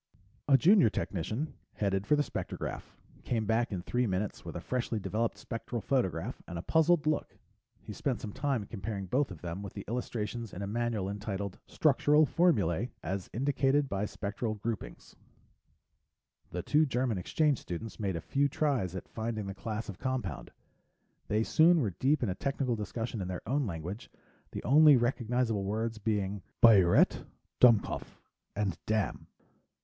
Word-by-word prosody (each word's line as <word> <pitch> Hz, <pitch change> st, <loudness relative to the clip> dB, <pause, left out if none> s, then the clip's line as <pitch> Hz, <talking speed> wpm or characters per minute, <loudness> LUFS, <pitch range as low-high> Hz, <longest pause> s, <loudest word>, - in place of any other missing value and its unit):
A 135 Hz, -2 st, +7 dB
junior 180 Hz, -, +6 dB
technician 110 Hz, -, -3 dB, 0.2 s
headed 100 Hz, -1 st, -1 dB
for 150 Hz, -, +5 dB
the 145 Hz, -, +2 dB
spectrograph, -, -, -4 dB, 0.4 s
came 115 Hz, -3 st, -1 dB
back 115 Hz, +2 st, +1 dB
in 90 Hz, -3 st, -3 dB
three 125 Hz, +4 st, 0 dB
minutes 95 Hz, +2 st, -2 dB
with -, -, -7 dB
a -, -, -3 dB
freshly 120 Hz, -3 st, -2 dB
developed 110 Hz, +3 st, -1 dB
spectral 115 Hz, +1 st, -5 dB
photograph 115 Hz, -, -1 dB
and 85 Hz, -, -6 dB
a 85 Hz, -, -5 dB
puzzled 160 Hz, -, +3 dB
look. 155 Hz, 0 st, -1 dB, 0.5 s
He 105 Hz, -, -7 dB
spent 125 Hz, 0 st, -2 dB
some 105 Hz, -1 st, -6 dB
time 135 Hz, -7 st, -1 dB
comparing 100 Hz, -1 st, -5 dB
both 130 Hz, +9 st, +1 dB
of 95 Hz, -6 st, -10 dB
them 85 Hz, +2 st, -4 dB
with 100 Hz, -3 st, -7 dB
the -, -, -7 dB
illustrations 115 Hz, -1 st, -3 dB
in 100 Hz, -, -5 dB
a -, -, -2 dB
manual 110 Hz, -2 st, -1 dB
entitled 100 Hz, -1 st, -4 dB
Structural 150 Hz, +1 st, +4 dB
Formulae 120 Hz, -, +2 dB
as 95 Hz, +1 st, -3 dB
Indicated 140 Hz, +3 st, +2 dB
by 100 Hz, +1 st, -1 dB
Spectral 110 Hz, +2 st, -3 dB
Groupings. 110 Hz, +1 st, -6 dB, 1.3 s
The 90 Hz, +1 st, -4 dB
two 150 Hz, +8 st, +3 dB
German 125 Hz, -5 st, 0 dB
exchange 145 Hz, -, +1 dB
students 95 Hz, +6 st, -6 dB
made 100 Hz, -4 st, -1 dB
a 85 Hz, -, -3 dB
few 140 Hz, +1 st, +1 dB
tries 130 Hz, -, 0 dB
at 95 Hz, -, -6 dB
finding 110 Hz, -2 st, -4 dB
the 100 Hz, -, -4 dB
class 110 Hz, +3 st, -5 dB
of 100 Hz, -, -8 dB
compound. 125 Hz, -, -3 dB, 0.8 s
They 105 Hz, +1 st, +1 dB
soon 165 Hz, +6 st, +5 dB
were 110 Hz, -9 st, 0 dB
deep 130 Hz, -, +1 dB
in 115 Hz, -, +1 dB
a -, -, 0 dB
technical 135 Hz, +2 st, -1 dB
discussion 115 Hz, +1 st, -4 dB
in 90 Hz, -, -3 dB
their 90 Hz, -1 st, -6 dB
own 135 Hz, +1 st, +1 dB
language, 90 Hz, +6 st, -6 dB, 0.4 s
the -, -, -5 dB
only 150 Hz, +1 st, +7 dB
recognizable 120 Hz, -3 st, 0 dB
words 110 Hz, +3 st, -2 dB
being 100 Hz, -2 st, -1 dB, 0.2 s
"biuret," 100 Hz, -7 st, +6 dB, 0.4 s
"dumkopf," 115 Hz, -5 st, +3 dB, 0.4 s
and 100 Hz, -4 st, -1 dB
"damn." 110 Hz, -3 st, -1 dB
110 Hz, 160 wpm, -31 LUFS, 100-130 Hz, 1.3 s, A